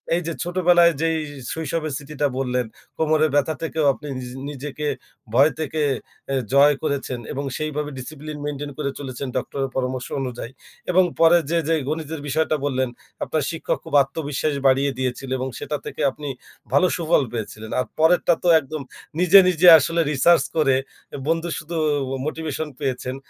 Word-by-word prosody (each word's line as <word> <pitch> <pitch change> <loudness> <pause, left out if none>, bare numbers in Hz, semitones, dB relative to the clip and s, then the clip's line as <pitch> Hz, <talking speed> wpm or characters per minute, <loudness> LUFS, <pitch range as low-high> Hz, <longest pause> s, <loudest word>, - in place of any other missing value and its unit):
এই 175 - 0
যে 165 - -2
ছোটবেলায় 175 -1 +4
যেই 165 0 +1 0.4
শৈশবের 160 -1 -3
স্মৃতিটা 150 0 -2
বললেন, 125 -2 0 0.3
কোমরের 155 -1 +3
ব্যাথা 145 +2 +2
থেকেও 160 -2 -1
আপনি 150 - -10
নিজ 125 -1 -6 0.2
নিজেকে 150 +1 -5 0.5
ভয় 140 +5 +5
থেকে 155 0 -2 0.5
অ্যা 135 - -1 0.2
জয় 145 +1 +7
করেছেন 140 -4 -2
এবং 140 - -3
সেইভাবে 150 -1 -3
ডিসিপ্লিন 150 +3 -7
মেইনটেইন 145 0 -4
করে 140 -2 -2
চলেছেন, 135 0 -5
ডক্টরের 135 +1 -2
পরামর্শ 130 -1 -2
অনুযায়ী 125 -2 -4 0.5
এবং 185 +1 +5 0.2
পরে 165 +1 +7
যে, 170 - +2
যে 165 - +3
গণিতের 155 -1 -4
বিষয়টা 155 +2 +1
বললেন 130 -2 0 0.3
আপনার 155 -3 -1
শিক্ষক 165 - -2
খুব - - -11
আত্মবিশ্বাস 145 +1 -2
বাড়িয়ে 135 +1 +3
দিয়েছিল 130 +1 -3
এবং 130 - -2
সেটা 150 +1 -3
থেকে - - -6
আপনি 145 +1 -8 0.5
ভালো 185 - +5
সুফল 165 -4 +2
পেয়েছিলেন। 110 -1 -6
আর 125 - 0
পরেরটা 170 +1 +4
তো - - 0
একদম 155 +1 -6 0.4
নিজে, 180 +2 +8
নিজে 180 0 +3
আসলে 165 +4 +1
রিসার্চ 170 +5 +4
করে 135 -4 +4 0.4
এ - - -4
বন্ধু 165 +1 0
শুধু 165 +2 -6 0.5
মোটিভেশন 155 -1 -3
পেয়েছেন, 130 -2 -2
150 Hz, 155 wpm, -22 LUFS, 135-160 Hz, 0.5 s, নিজে